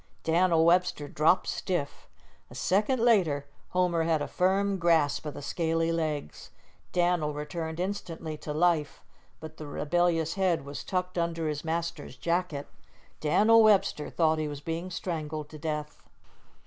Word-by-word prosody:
Dan'l 165 0 +3
Webster 175 -3 +2
dropped 155 +6 +3
stiff. 175 -7 -3 0.4
A - - -12
second 210 +8 +1
later 180 -12 +3 0.2
Homer 180 -2 +1
had 160 -1 +2
a 145 - -3
firm 195 +1 +1
grasp 160 -3 +2
of 150 - -6
the - - -7
scaly 165 +2 0
legs. 155 - -3 0.4
Dan'l 175 -4 +1
returned 160 +2 -5
instantly 170 -4 -4
to 150 - -6
life, 155 -1 +1 0.4
but 160 0 -10
the 155 - -8
rebellious 165 +2 +1
head 185 -7 0
was 140 0 -6
tucked 180 -1 -2
under 165 -1 -1
his 150 -1 -3
master's 170 +1 -3
jacket. 170 -4 -2 0.5
Dan'l 215 +9 +5
Webster 200 -8 +3
thought 160 -2 +2
he 155 - -1
was 145 -1 -6
being 165 +4 -4
strangled 155 -4 -4
to 155 - -10
death. 150 -1 -4
165 Hz, 145 wpm, -28 LUFS, 150-180 Hz, 0.5 s, Dan'l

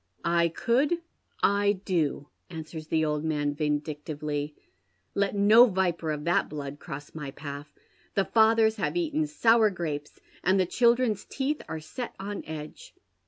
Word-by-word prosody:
"I 170 0 +3
could. 250 - +1 0.5
I 205 0 +4
do," 155 -6 0 0.2
answers 160 -1 -7
the 160 -1 +1
old 150 0 -1
man, 145 -2 0
vindictively. 150 0 -3 0.6
"Let 200 0 0
no 215 +5 +7
viper 180 -5 0
of 150 -1 -2
that 175 +4 +1
blood 145 -1 -6
cross 145 -3 -8
my 150 -3 -6
path. 145 +1 -8 0.2
' - - -35
The 195 - +2
fathers 220 0 +4
have 215 - -1
eaten 310 -2 0
sour 230 -7 +4
grapes, 155 -6 -5 0.2
and 190 +2 +3
the 185 - +3
children's 235 +1 +2
teeth 285 +3 -2
are 160 - -3
set 235 +10 -7
on 200 +1 -5
edge.' 155 -1 -8
170 Hz, 150 wpm, -28 LUFS, 150-220 Hz, 0.6 s, no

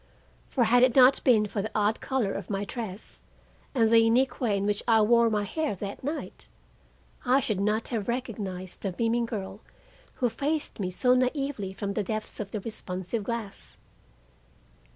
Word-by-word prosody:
For 255 - +2
had 240 +2 +4
it 255 -1 +4
not 260 0 +6
been 220 -5 +5
for 205 0 -3
the 215 - -4
odd 210 +1 +1
color 255 -7 -1
of 195 - -6
my 200 0 -2
dress 215 -2 -6 0.5
and 230 -3 +4
the 230 +1 +6
unique 235 +5 +2
way 215 -5 +2
in 195 - -1
which 205 0 0
I 225 -2 +5
wore 235 +1 +4
my 210 -2 0
hair 305 +2 -2
that 200 +4 -7
night, 295 +4 -4 0.8
I 255 +2 +4
should 215 -7 -1
not 210 +3 0
have 225 -5 -2
recognized 205 -7 -4
the 195 - -2
beaming 230 +4 +1
girl 205 -2 -6 0.5
who 250 - +1
faced 290 +6 -2
me 185 -3 -1
so 250 +7 +3
naively 255 -5 0
from 200 +1 -4
the 210 - 0
depths 215 +2 -4
of 205 -2 -4
the 210 0 -4
responsive 190 0 -4
glass. 225 -2 -5
220 Hz, 175 wpm, -27 LUFS, 200-245 Hz, 0.8 s, not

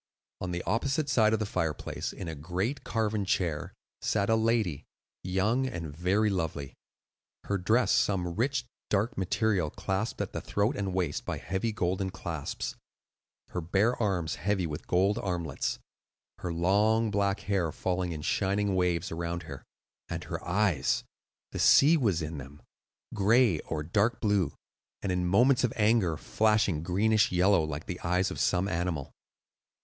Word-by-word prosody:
On 90 - -4
the 85 0 -3
opposite 135 +6 0
side 110 -4 +4
of 110 - +3
the 110 - -2
fireplace, 80 -6 -3
in 90 - -7
a 80 - -3
great 90 - -3
carven 110 -2 -1
chair, 90 -1 -1 0.3
sat 100 0 +1
a - - +5
lady, 110 - +1 0.4
young 105 +8 +1
and 85 - -5
very 100 +6 +2
lovely,—her 80 +3 -6
dress 110 +4 +2
some 90 -4 +1
rich 120 +4 0 0.2
dark 105 +4 +1
green - - -5
material 95 -3 +1
clasped 95 +8 -3
at - - -3
the - - -3
throat 105 +7 0
and 95 -5 -2
waist 85 -6 -1
by - - -3
heavy 95 +5 -2
golden 95 -1 -1
clasps, 85 -5 -5 0.7
her 90 - -3
bare 100 +9 +2
arms 90 -7 0
heavy 100 -1 +1
with 75 -2 -6
gold 100 +5 +2
armlets, 85 -7 -2 0.6
her 90 - -3
long 105 +6 +2
black 100 -1 +1
hair 95 -6 0
falling 90 +1 -2
in 75 -2 -5
shining 100 +4 +1
waves 90 -1 0
around 85 +1 -3
her, 70 -4 -9 0.5
and - - -4
her - - -5
eyes,—the 90 -6 -2
sea 150 +4 +7
was 100 - +1
in 75 -1 -5
them,—gray 95 - 0
or 75 -1 -4
dark 110 +8 +1
blue, 105 -5 +1 0.5
and 100 - 0
in 90 -1 0
moments 125 +8 +4
of 125 - +2
anger 105 -7 +2
flashing 105 -7 +1
greenish 105 +5 +2
yellow 90 -1 +4
like 75 0 -4
the 90 - -5
eyes 90 +2 0
of - - -5
some 95 +1 +2
animal. 85 -6 -2
95 Hz, 155 wpm, -29 LUFS, 85-110 Hz, 0.7 s, sea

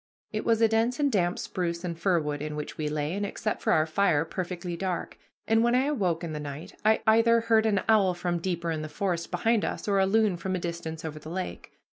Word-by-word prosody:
It 215 - -3
was 230 -1 +2
a - - +7
dense 225 +4 +1
and 285 -1 +2
damp 175 -4 +1
spruce 170 -1 -3
and 175 -2 -3
fir 170 +1 +2
wood 150 -2 -3
in 150 0 -4
which 150 0 -5
we 150 -1 -2
lay, 150 +1 -2
and, 205 +2 -2
except 215 +1 -3
for - - +1
our 155 - +4
fire, 165 -2 +2
perfectly 175 0 -4
dark; 180 0 -3 0.3
and 225 +1 +4
when 240 +1 +3
I 255 +2 +3
awoke 185 - 0
in 165 -2 -4
the 150 - -4
night, 145 +1 -7
I 220 +1 +3
either 230 +1 +5
heard 225 -1 +3
an 200 -3 +2
owl 200 -5 +4
from 175 0 -1
deeper 170 -1 -2
in 155 -1 -2
the 155 - -5
forest 170 +1 -2
behind 220 +5 +1
us, - - -3
or 200 -1 +3
a 190 - +3
loon 215 -2 +2
from 185 +2 -2
a - - -2
distance 170 -2 -5
over 155 -1 -5
the 155 - -10
lake. 185 +2 -5
180 Hz, 245 wpm, -27 LUFS, 165-220 Hz, 0.3 s, a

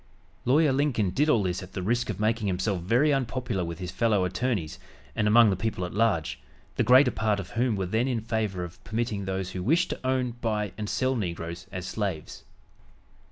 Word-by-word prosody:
Lawyer 145 +2 +4
Lincoln 130 -9 +1
did 150 - +1
all 115 -8 +4
this 90 -1 -2
at 95 0 -11
the 95 - -4
risk 120 +5 0
of 105 -2 -3
making 110 0 +1
himself 95 0 -1
very 125 - +3
unpopular 125 -6 -1
with 85 -1 -5
his 90 -2 -5
fellow 100 0 +2
attorneys 100 -4 -2 0.4
and 105 - +1
among 110 0 +6
the - - +1
people 95 -2 -2
at 90 - -7
large, 85 - +1 0.4
the - - +1
greater 125 +3 +6
part 105 -2 0
of 95 - -7
whom 120 -1 +1
were 95 -1 -1
then 110 +7 0
in 125 -3 0
favor 110 -5 -2
of 90 0 -10
permitting 110 -3 -2
those 95 -1 -3
who 90 - -4
wished 160 - +2
to - - -4
own, 130 -1 0
buy 105 -3 -1
and 105 -1 -4
sell 130 +1 0
negroes 85 -3 -4
as 90 -1 -5
slaves. 95 -4 -4
105 Hz, 205 wpm, -27 LUFS, 95-120 Hz, 0.4 s, among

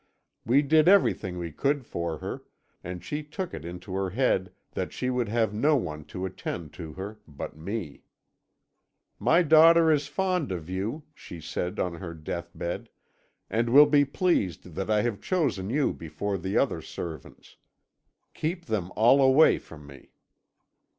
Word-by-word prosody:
We 135 +6 +3
did 155 +3 +4
everything 180 - +3
we 85 -1 -4
could 140 - 0
for 85 -5 -3
her, - - -6 0.4
and 90 0 -6
she 150 +1 -3
took 170 +5 -6
it 80 - -6
into 90 +3 -8
her 95 0 -1
head 95 -3 +1 0.2
that - - -3
she 125 - -2
would 125 -3 -1
have 110 -2 +1
no 145 +9 +3
one 75 - -3
to 90 - -5
attend 85 -3 -6
to 80 -3 -8
her 100 +5 -7
but 70 -2 -7
me. 85 -1 -5 1.2
"'My 175 +2 +4
daughter 165 +1 +7
is 145 -2 +1
fond 180 - -1
of 90 -1 -5
you,' 110 +11 -3
she 85 - -10
said 90 +3 -4
on 90 - -1
her 85 -1 -7
deathbed, 85 +2 -5 0.6
'and 115 +3 0
will 145 +5 +9
be 145 -1 +4
pleased 130 - -1
that 95 +6 -4
I 105 -1 +3
have 110 -4 -2
chosen 140 - 0
you 140 +3 +1
before 95 +5 -4
the 95 +3 -2
other - - +1
servants. 80 -5 -9 0.8
Keep 170 +3 -3
them 100 -6 -2
all 120 +6 +5
away 135 +4 +6
from 75 -3 -13
me.' 70 -1 -14
105 Hz, 160 wpm, -27 LUFS, 85-145 Hz, 1.2 s, will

